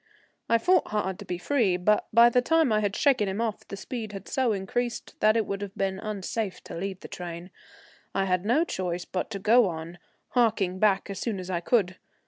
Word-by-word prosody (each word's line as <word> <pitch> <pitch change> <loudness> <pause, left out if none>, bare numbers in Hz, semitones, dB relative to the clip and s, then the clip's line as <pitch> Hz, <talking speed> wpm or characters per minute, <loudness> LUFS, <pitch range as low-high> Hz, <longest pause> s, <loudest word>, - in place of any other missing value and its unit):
I 230 - +5
fought 360 +9 +3
hard 190 -3 -2
to - - -8
be 180 - -3
free, 200 -2 +1
but 210 +4 +2
by 235 +1 +7
the 250 +1 +3
time 320 -2 +3
I 215 - +3
had 205 -1 -1
shaken 260 -8 +2
him 190 +3 -3
off 225 -3 -3
the 200 - -7
speed 220 0 -6
had 195 -1 -8
so 260 -3 +1
increased 230 +5 -3
that 215 +1 +4
it 220 - +1
would 200 0 -4
have 200 -1 -6
been 190 -1 -1
unsafe 210 -1 -4
to - - -8
leave 185 +2 -4
the - - -8
train. 175 0 -7 0.6
I 195 - +2
had 185 -1 0
no 245 +10 +3
choice 180 - -3
but 185 - -3
to 210 - -4
go 220 +3 +4
on, 165 +1 -7 0.3
harking 210 -7 +1
back 200 -1 +2
as 195 - -5
soon 220 -5 -2
as 185 0 -6
I 175 - 0
could. 185 -1 +1
200 Hz, 220 wpm, -27 LUFS, 185-230 Hz, 0.6 s, by